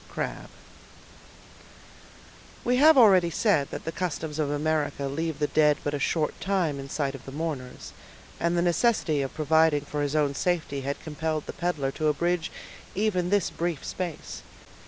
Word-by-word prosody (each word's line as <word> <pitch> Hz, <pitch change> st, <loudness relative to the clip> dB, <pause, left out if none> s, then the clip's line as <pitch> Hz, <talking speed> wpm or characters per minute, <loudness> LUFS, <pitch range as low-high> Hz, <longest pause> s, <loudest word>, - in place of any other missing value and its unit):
—CRABBE. -, -, -4 dB, 2.1 s
We 245 Hz, +1 st, +2 dB
have 310 Hz, +2 st, +7 dB
already 190 Hz, -8 st, +6 dB
said 165 Hz, -6 st, +1 dB
that -, -, -7 dB
the 165 Hz, -, -2 dB
customs 160 Hz, -3 st, -3 dB
of 150 Hz, -2 st, 0 dB
America 145 Hz, -1 st, -1 dB
leave 160 Hz, +3 st, -2 dB
the 150 Hz, -, +1 dB
dead 150 Hz, -1 st, +3 dB
but 145 Hz, -, -2 dB
a 145 Hz, -, -1 dB
short 155 Hz, +1 st, -1 dB
time 180 Hz, -7 st, 0 dB
in 135 Hz, 0 st, -7 dB
sight 140 Hz, -1 st, -1 dB
of 135 Hz, -, -9 dB
the -, -, -6 dB
mourners; 145 Hz, -4 st, -5 dB, 0.5 s
and 170 Hz, +1 st, +1 dB
the 170 Hz, -, +2 dB
necessity 175 Hz, -4 st, +2 dB
of 135 Hz, -, -4 dB
providing 160 Hz, -1 st, +3 dB
for 145 Hz, +1 st, -3 dB
his 145 Hz, +1 st, -1 dB
own 145 Hz, -2 st, +2 dB
safety 155 Hz, -3 st, -1 dB
had 140 Hz, +1 st, -3 dB
compelled 155 Hz, 0 st, -3 dB
the -, -, -6 dB
peddler 160 Hz, -6 st, -1 dB
to 155 Hz, +2 st, -1 dB
abridge 170 Hz, +3 st, 0 dB, 0.4 s
even 185 Hz, -4 st, 0 dB
this 205 Hz, -2 st, +2 dB
brief 170 Hz, -4 st, -3 dB
space. 175 Hz, -4 st, -5 dB
155 Hz, 165 wpm, -27 LUFS, 145-175 Hz, 2.1 s, have